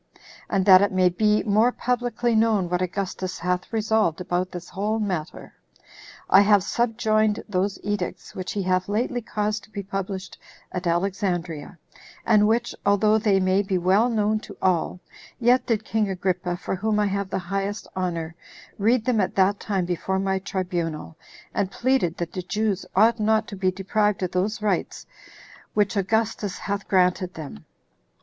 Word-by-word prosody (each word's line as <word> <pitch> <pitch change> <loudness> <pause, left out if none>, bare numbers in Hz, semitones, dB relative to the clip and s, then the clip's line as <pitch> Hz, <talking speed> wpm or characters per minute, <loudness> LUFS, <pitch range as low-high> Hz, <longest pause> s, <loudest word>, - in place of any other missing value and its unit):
And 190 -1 +1
that 185 -1 +8
it 200 - +2
may 185 -1 +3
be 210 +4 +2
more 220 +3 +3
publicly 245 -1 -1
known 220 -5 +2
what 180 0 0
Augustus 185 0 -3
hath 180 0 -2
resolved 220 -6 +1
about 180 0 -2
this 175 -1 -7
whole 210 +3 -1
matter, 180 -7 -4 0.7
I 195 - +7
have 205 -1 +4
subjoined 220 -2 +1
those 195 -1 -1
edicts 205 -3 -4
which 185 -1 -5
he 200 - -2
hath 185 +1 0
lately 240 +4 -1
caused 210 -1 -2
to - - -26
be 200 -2 -6
published 195 0 -5 0.3
at 180 -1 -3
Alexandria, 175 -2 -2 0.5
and 210 -2 +5
which, 235 +2 +1
although 210 +2 +3
they 205 -3 +3
may 185 +1 +2
be 195 -2 -1
well 190 +7 +3
known 215 -1 +1
to - - -12
all, 180 -1 0 0.4
yet 245 +1 +3
did 220 -2 0
king 215 -2 0
Agrippa, 180 -1 -1
for - - -4
whom 210 +2 0
I 210 - +3
have 200 -1 -2
the - - -2
highest 195 +3 -3
honor, 170 -3 -2 0.5
read 225 +3 +2
them 245 -5 +2
at 185 - -2
that 195 +1 +3
time 195 -4 -1
before 180 +2 -2
my 190 0 0
tribunal, 175 -5 -3 0.4
and 195 - 0
pleaded 240 -7 0
that 170 -1 -4
the 185 - -3
Jews 200 +2 -2
ought 225 +4 +4
not 215 0 +2
to 205 - -6
be 190 -1 +1
deprived 195 +2 0
of 180 - -1
those 210 +4 -1
rights 195 -5 -1 0.7
which 210 0 +2
Augustus 205 -1 0
hath 200 0 -4
granted 185 -1 +2
them. 145 - -9
195 Hz, 165 wpm, -24 LUFS, 185-215 Hz, 0.7 s, that